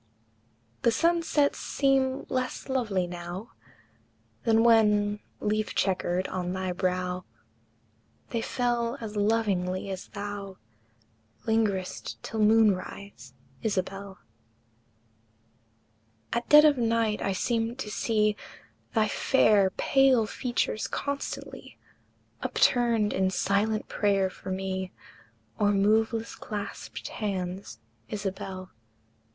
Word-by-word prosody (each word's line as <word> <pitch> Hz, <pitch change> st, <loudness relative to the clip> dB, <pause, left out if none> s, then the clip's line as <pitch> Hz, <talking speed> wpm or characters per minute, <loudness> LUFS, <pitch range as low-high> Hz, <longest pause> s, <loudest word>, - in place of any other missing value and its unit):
The -, -, +4 dB
sunsets 330 Hz, +1 st, +2 dB
seem 270 Hz, -1 st, +1 dB
less 255 Hz, 0 st, -3 dB
lovely 215 Hz, -9 st, 0 dB
now 175 Hz, +4 st, -7 dB, 0.9 s
Than 225 Hz, -1 st, +4 dB
when, 210 Hz, -3 st, +4 dB, 0.2 s
leaf 215 Hz, 0 st, -1 dB
checkered, 185 Hz, -1 st, 0 dB
on 180 Hz, -1 st, -3 dB
thy 185 Hz, -1 st, -2 dB
brow 180 Hz, 0 st, -1 dB, 1.1 s
They 230 Hz, -, -1 dB
fell 240 Hz, +1 st, -1 dB
as 220 Hz, -3 st, -6 dB
lovingly 200 Hz, -3 st, 0 dB
as 190 Hz, -1 st, -6 dB
thou 200 Hz, -1 st, -6 dB, 0.9 s
Lingered'st 215 Hz, -5 st, 0 dB
till 220 Hz, -, -4 dB
moon 215 Hz, -1 st, +5 dB
rise, 185 Hz, -9 st, -10 dB, 0.3 s
Isabel! 195 Hz, -1 st, -3 dB, 2.2 s
At 235 Hz, +1 st, -2 dB
dead 300 Hz, +1 st, +9 dB
of 290 Hz, -4 st, +4 dB
night 230 Hz, -2 st, +1 dB
I 195 Hz, -, 0 dB
seem 230 Hz, +4 st, 0 dB
to 235 Hz, -5 st, -6 dB
see 215 Hz, -1 st, +1 dB, 0.6 s
Thy 220 Hz, -1 st, +4 dB
fair, 210 Hz, -3 st, +4 dB
pale 270 Hz, -4 st, +4 dB
features 240 Hz, -1 st, -2 dB
constantly 280 Hz, 0 st, -5 dB, 0.6 s
Upturned 235 Hz, -4 st, +2 dB
in 190 Hz, 0 st, +2 dB
silent 205 Hz, +3 st, 0 dB
prayer 195 Hz, -2 st, +1 dB
for 190 Hz, -, -9 dB
me, 190 Hz, 0 st, -3 dB, 0.7 s
O'er 205 Hz, -, +4 dB
moveless 220 Hz, +3 st, +2 dB
clasped 205 Hz, -2 st, -6 dB
hands, 185 Hz, -, -4 dB, 0.3 s
Isabel! 190 Hz, -2 st, -5 dB
210 Hz, 100 wpm, -28 LUFS, 190-230 Hz, 2.2 s, dead